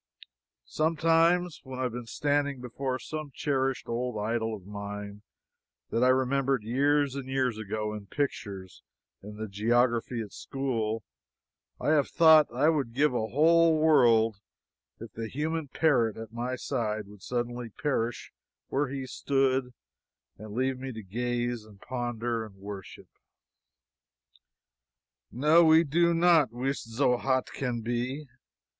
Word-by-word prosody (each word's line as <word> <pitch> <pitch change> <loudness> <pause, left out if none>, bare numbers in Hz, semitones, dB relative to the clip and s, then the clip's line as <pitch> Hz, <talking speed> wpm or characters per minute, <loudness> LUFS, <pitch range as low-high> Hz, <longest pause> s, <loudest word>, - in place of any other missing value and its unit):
Sometimes 165 - +2
when 130 -1 -8
I 130 - -2
have 125 - -1
been 120 0 -7
standing 145 +1 0
before 130 +1 -3
some 155 +1 -6
cherished 135 -2 -1
old 120 0 -2
idol 110 +1 -1
of 95 -4 -13
mine 100 0 -7 0.7
that 115 - +1
I - - +5
remembered 130 -1 +2
years 140 +4 +2
and 135 -1 -6
years 130 -4 0
ago 105 0 -3
in 105 -2 -8
pictures 100 -9 -4 0.4
in 105 +1 -10
the 110 0 -4
geography 120 +3 +1
at 105 -3 -7
school, 115 -5 -3 0.8
I - - -1
have 150 -3 +3
thought 160 -2 +6
I 130 +5 +2
would 140 -8 0
give 145 0 +3
a 110 -2 -1
whole 165 +4 +4
world 115 -9 +4 0.6
if 115 -2 -9
the 115 0 -5
human 155 +5 -2
parrot 130 -7 +2
at 110 0 -8
my 120 +2 -3
side 110 -5 -2
would 100 -1 -15
suddenly 120 0 -3
perish 120 -1 -2 0.4
where 145 +1 0
he 135 0 -5
stood 135 -1 0 0.6
and 110 0 -10
leave 130 +1 0
me 135 0 -5
to 110 -1 -8
gaze, 120 +3 -2
and 105 -2 -17
ponder, 120 -2 -3
and 105 -3 -11
worship. 100 0 -9 2.2
No, 150 +7 +5
we 160 0 +6
did 170 +3 +2
not 165 -7 +4
"wis 130 +4 -2
zo 125 +2 +1
haut 130 0 0
can 125 -3 -2
be." 120 +5 -3
125 Hz, 140 wpm, -28 LUFS, 115-140 Hz, 2.2 s, thought